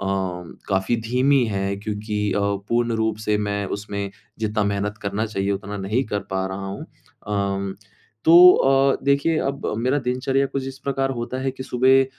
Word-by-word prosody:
अ, 100 - -3 0.6
काफ़ी 95 +4 +1
धीमी 125 +3 +2
है, 100 -1 -2
क्योंकि 105 0 -3
अ, 100 - 0 0.3
पूर्ण 120 0 +1
रूप 110 -1 0
से 105 0 +3
मैं 100 -1 -1
उसमें 100 -1 -5 0.3
जितना 110 -1 0
मेहनत 100 +1 -2
करना 100 +3 -1
चाहिए, 100 -2 -2
उतना 100 +1 -4
नहीं 105 +7 -1
कर 105 -2 -2
पा 95 0 -1
रहा 95 +1 -5
हूँ। 100 +1 -6 0.4
अम 100 -1 -1 0.5
तो 165 - +5 0.2
अ, 135 0 +3
देखिए, 140 +3 +2
अब 140 0 -2
मेरा 130 +5 +1
दिनचर्या 135 +2 0
कुछ 135 0 -4
इस 135 0 -9
प्रकार 135 0 -1
होता 125 +1 -4
है 135 - 0
कि 130 0 -8
सुबह 130 +2 +4
110 Hz, 170 wpm, -22 LUFS, 100-130 Hz, 0.6 s, तो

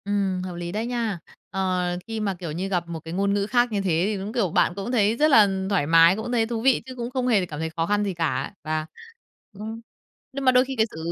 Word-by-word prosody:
Ừm, 200 -2 0
hợp 185 -1 -6
lý 175 0 -5
đấy 215 +4 -2
nha. 230 -6 -2 0.3
Ờ, 185 -1 -1 0.3
khi 225 -1 -4
mà, 205 -2 -1
kiểu 170 -4 -5
như, 180 +5 -3
gặp 175 -3 -1
một 170 -1 -5
cái 165 +1 -8
ngôn 200 +2 +1
ngữ 200 0 +1
khác 240 0 +2
như 205 -2 0
thế 170 -3 +1
thì 210 0 -1
đúng, 200 +3 -5
kiểu, 230 -7 +1
bạn - - +2
cũng 200 +4 -4
thấy 220 -3 +3
rất 305 +2 +3
là 220 -6 +7 0.2
thoải 190 -8 +1
mái, 165 +2 +6
cũng 220 +3 -5
thấy 230 -2 +2
thú 225 0 -3
vị 260 +1 +3
chứ 260 -1 -9
cũng 240 -1 -4
không 255 -1 -1
hề 210 -7 +3
cảm 150 -4 -7
thấy 160 0 -2
khó 165 +1 -2
khăn 205 +2 +1
gì 200 -2 -2
cả. 165 -4 -2
Và, 155 0 -2 0.7
ừm, 220 +3 -7 0.5
nhưng 275 0 -4
mà 255 - +7
đôi 255 0 +4
khi 265 0 -5
cái 220 -2 +3
sự, - - -10
200 Hz, 270 wpm, -24 LUFS, 175-230 Hz, 0.7 s, là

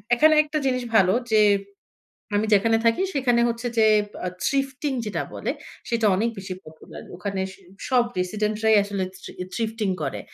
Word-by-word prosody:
এখানে 310 +5 +5
একটা 305 0 -3
জিনিস 255 -2 0
ভালো 190 -3 +5 0.2
যে 215 -1 +5 0.9
আমি 205 +1 +2
যেখানে 225 +3 +4
থাকি 230 +8 +3
সেখানে 250 -4 +2
হচ্ছে 235 +1 -3
যে 220 - +5 0.4
আ - - 0 0.2
thrifting 275 +1 -1
যেটা 210 - -2
বলে - - -2 0.4
সেটা 230 -1 +1
অনেক 225 +5 +1
বেশি 190 -1 -5
পপুলার। 155 0 -12
ওখানে 190 +2 -3
স - - -14 0.3
সব 250 -2 +4 0.2
residents 210 +3 -1
রাই 220 0 +6
আসলে 200 -1 -3 0.2
থ্রি - - -9 0.2
thrifting 220 -4 -1
করে। 135 - -3
220 Hz, 165 wpm, -24 LUFS, 200-250 Hz, 0.9 s, রাই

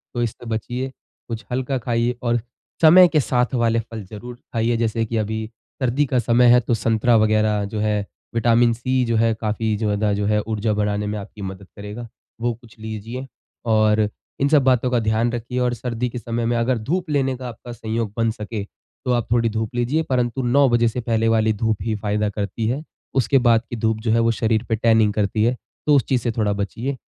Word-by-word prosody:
तो 120 - 0
इससे 120 +1 -5
बचिए। 125 +4 -3 0.4
कुछ 115 0 -5
हल्का 130 +2 -1
खाइए 120 0 0
और 120 0 +1 0.4
समय 175 +3 +8
के 155 - +2
साथ 125 -1 0
वाले 115 -1 +2
फल 115 -1 -7
ज़रूर 115 +5 -9 0.2
खाइए। 115 0 +1
जैसे 115 0 0
कि 115 +1 -3
अभी 110 +1 -2 0.4
सर्दी 130 +3 +2
का 130 -1 +1
समय 120 +1 +4
है 125 - +7
तो 120 - -1
संतरा 115 +2 +2
वगैरह 110 -1 +2
जो 105 +1 -4
है, 105 -1 0 0.3
विटामिन 115 0 +4
सी 130 +2 0
जो 115 -1 0
है 115 0 +3
काफ़ी 110 0 -1
ज़्यादा 105 -1 0
जो 100 0 -1
है 105 0 +2
ऊर्जा 110 0 -1
बढ़ाने 105 0 -1
में 105 +1 -2
आपकी 100 +1 -10
मदद 95 0 -7
करेगा। 105 +4 -7 0.3
वो 120 0 +1
कुछ 115 0 -18
लीजिए 110 +4 -6 0.5
और 110 0 +3 0.3
इन 140 - +3
सब 145 -3 +5
बातों 125 -1 +3
का 120 - +3
ध्यान 110 +2 +1
रखिए। 120 +2 -3
और 125 -1 +1
सर्दी 120 +1 -3
के 125 - -7
समय 115 +1 -3
में 120 0 +1
अगर 120 +2 +1
धूप 175 -1 -1
लेने 135 -2 +1
का 125 -1 -6
आपका 120 +1 -10
संयोग 110 -2 -3
बन 115 -1 +2
सके 110 -1 -5 0.4
तो 125 - +1
आप 120 -2 0
थोड़ी 115 -1 +3
धूप 110 +1 -3
लीजिए, 125 +7 +1
परंतु 125 -2 0
9 135 +3 +4
बजे 120 -1 +3
से 125 +2 -2
पहले 115 -1 +1
वाली 110 -1 +3
धूप 110 0 0
ही 110 -1 -1
फ़ायदा 105 0 -1
करती 100 +2 -3
है। 135 +6 -2 0.3
उसके 135 +1 +3
बाद 115 -1 +5
की - - -4
धूप 110 0 0
जो 110 -1 0
है 115 - +3
वो 115 0 +3
शरीर 110 0 0
पे 115 - +2
टैनिंग 110 -2 +3
करती 105 0 0
है। 120 +3 +2 0.3
तो 145 - +6
उस 135 - +4
चीज 125 -3 +2
से 120 - -1
थोड़ा 110 -2 0
बचिए। 115 +7 -3
115 Hz, 215 wpm, -22 LUFS, 110-120 Hz, 0.5 s, समय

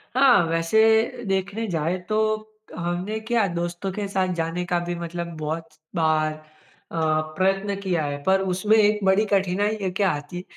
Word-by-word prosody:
हाँ। 250 -10 +6
वैसे 220 +8 +3
देखने 195 +4 -1
जाएँ 170 0 -1
तो, 215 0 +1 0.3
हमने 175 +5 -2
क्या 235 -4 +2
दोस्तों 175 +2 -3
के 205 +1 -3
साथ 185 -2 0
जाने 165 +2 -2
का 175 0 0
भी 175 0 -3
मतलब 170 0 -5
बहुत 160 +2 -4 0.3
बार 155 -1 +2 0.6
अ, - - -5 0.4
प्रयत्न 195 +2 +1
किया 175 -5 0
है। 145 0 -4
पर 190 0 +3
उसमें 190 +3 +2
एक 210 0 +4
बड़ी 190 +3 +4
कठिनाई 195 +1 +1
क्या 195 -2 +3
आती 145 +4 -6
है 180 - -6
185 Hz, 160 wpm, -24 LUFS, 170-210 Hz, 0.6 s, हाँ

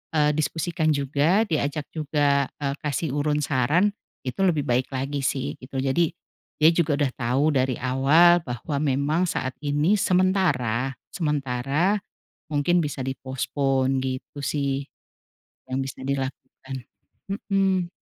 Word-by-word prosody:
eee, 150 -1 +4
diskusikan 160 +1 0
juga 145 +9 +2
diajak 150 -2 -1
juga, 145 -3 +1
eee, 140 -1 -1
kasih 150 0 -1
urun 150 +1 +1
saran, 150 +10 +2 0.3
itu 130 +5 -5
lebih 155 -5 +2
baik 125 +1 +1
lagi 140 +2 -2
sih 135 0 -1
gitu. 130 +2 -12
Jadi, 160 +5 +2 0.5
dia 155 +2 +7
juga 165 -3 +1
udah 140 -3 0
tahu 125 +3 0
dari 130 -2 +1
awal 140 +8 +5
bahwa 120 +4 -4
memang 150 +5 +1
saat 130 -5 -2
ini 150 +8 +2
sementara, 155 - +1 0.2
sementara 150 +4 0 0.5
mungkin 165 +4 +2
bisa 145 -2 -4
di-postpone 135 0 -1
gitu 130 +2 -5
sih. 140 0 -1 0.9
Yang 130 - -2
bisa - - -25
dilakukan 135 0 -4 0.5
mhm. 195 -3 0
145 Hz, 125 wpm, -25 LUFS, 130-160 Hz, 0.9 s, dia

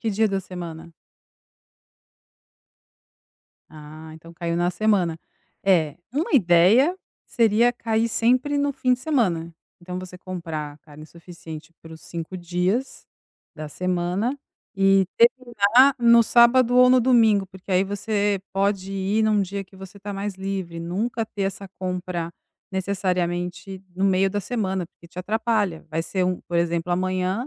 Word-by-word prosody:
que 225 - -1
dia 215 +1 +2
da 195 -1 -1
semana? 170 -3 -8 2.8
Ah, 155 +1 -11
então 165 +1 -14
caiu 170 0 -3
na 175 +1 +1
semana. 180 -4 +1 0.4
É, 165 -6 +2 0.2
uma 300 +5 -2
ideia 220 - +5 0.3
seria 230 +1 +3
cair 225 -1 -1
sempre 255 +6 +1
no 285 0 +1
fim 260 -2 +1
de 250 - -1
semana. 190 - 0 0.3
Então 180 +1 -6
você 185 0 -9
comprar 165 -5 -6
carne 155 0 -14
suficiente 165 -1 -11
para 165 0 -12
os 160 - -12
5 170 +2 -7
dias 180 +8 -2 0.5
da 155 -1 -7
semana 185 - -2 0.4
e 195 0 +4
terminar 240 +1 +4
no 235 0 +6
sábado 240 +2 +4
ou 250 0 +7
no 255 0 +5
domingo, 225 -5 +4
porque 190 0 -9
aí 185 - +4
você 205 0 -1
pode 195 0 -1
ir 195 +3 0
num 215 -1 +3
dia 195 +1 -5
que 190 - -23
você 190 +1 -12
está 200 0 -7
mais 200 0 -4
livre, 190 -3 -5
nunca 210 +7 -2
ter 210 -2 -6
essa 195 +1 -3
compra 180 -2 -3 0.4
necessariamente 185 -1 -2
no 190 +2 -1
meio 195 0 +3
da 205 +1 -2
semana, 190 -5 -2
porque 170 - -20
te 175 - -12
atrapalha. 210 -3 -1
Vai 160 +1 -1
ser 185 +2 -1
um 180 0 -1
por 175 - -2
exemplo, 170 +1 -1
amanhã, 185 +5 -1
190 Hz, 145 wpm, -23 LUFS, 175-220 Hz, 2.8 s, ou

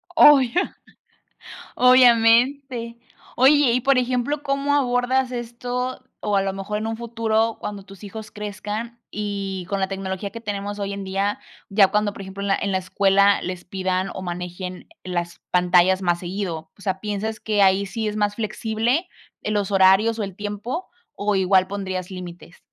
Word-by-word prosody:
Oh, 295 -2 +8
ya. 260 +10 -1 1.0
Obviamente. 245 0 +4 0.4
Oye, 270 0 +5
y 250 - +2
por 270 0 +3
ejemplo, 255 +4 0
¿cómo 280 +1 0
abordas 255 -1 +1
esto 245 +2 -4 0.2
o 205 -1 0
a 195 - +3
lo 195 - -1
mejor 195 +2 -4
en 220 - -3
un 225 0 -3
futuro 225 -1 0
cuando 205 -1 -5
tus 195 0 -14
hijos 210 +1 -8
crezcan 210 +3 -6
y 200 -3 -4
con 200 - -1
la 190 - 0
tecnología 195 0 -4
que 230 - -8
tenemos 205 -2 -4
hoy 200 0 -3
en 200 - -6
día, 195 +2 -1 0.3
ya 200 -1 +5
cuando, 210 0 0
por 200 - -9
ejemplo, 195 +1 -7
en 200 - -2
la 195 - +3
en 200 -1 -1
la 190 - +2
escuela 195 +2 +3
les 180 -1 -5
pidan 185 0 -2
o 190 - -6
manejen 180 +1 -6 0.2
las 175 -1 -4
pantallas 180 +1 +4
más 175 -1 +1
seguido? 175 -3 -4
O - - -18
sea, 190 -2 -2
¿piensas 215 +1 -3
que 210 -2 +1
ahí 195 +1 +4
sí 220 +1 -3
es 210 - -4
más 205 -1 +1
flexible 225 - -1 0.3
en 215 - -2
los 205 -1 0
horarios 195 +4 +4
o - - -1
el 195 -2 -6
tiempo 210 - -4 0.3
o 205 0 -1
igual 190 0 +3
pondrías 185 -1 -4
límites? 180 -1 -9
205 Hz, 175 wpm, -23 LUFS, 190-235 Hz, 1.0 s, Oh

